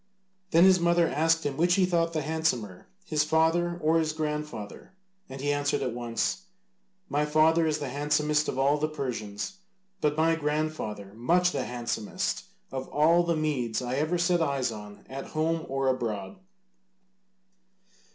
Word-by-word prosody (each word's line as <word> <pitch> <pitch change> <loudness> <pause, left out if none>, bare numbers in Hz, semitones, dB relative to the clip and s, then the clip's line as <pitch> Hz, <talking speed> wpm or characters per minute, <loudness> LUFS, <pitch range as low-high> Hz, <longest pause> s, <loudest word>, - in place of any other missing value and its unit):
Then 165 0 +5
his 190 -1 +6
mother 170 0 +3
asked 165 +2 +1
him 140 -2 -2
which 175 +2 +3
he 190 - +4
thought 170 -2 +1
the 155 -3 -2
handsomer, 135 - -2 0.2
his 150 -3 +1
father 165 +2 +2
or 160 +2 +4
his 155 -1 0
grandfather, 150 - -5 0.4
and 135 - -8
he 145 +1 +1
answered 145 -1 0
at 125 -3 -2
once, 120 +10 -2 0.6
"My 145 -3 0
father 160 +2 +3
is 155 -1 +1
the 145 -3 -4
handsomest 150 +2 +1
of - - -3
all 140 +2 +3
the 155 - +1
Persians, 130 - -5 0.4
but 150 0 +1
my 165 +1 +3
grandfather 150 -10 -3
much 175 +11 +2
the - - -2
handsomest 120 -3 -3 0.3
of 130 0 -4
all 165 +4 +4
the 170 -1 0
Medes 140 -7 -1
I 125 +1 -3
ever 155 +4 +1
set 175 0 +2
eyes 140 -5 0
on, 105 -1 -10
at 135 +1 -7
home 160 +1 0
or 135 0 -1
abroad." 115 - -2
150 Hz, 160 wpm, -28 LUFS, 130-165 Hz, 0.6 s, his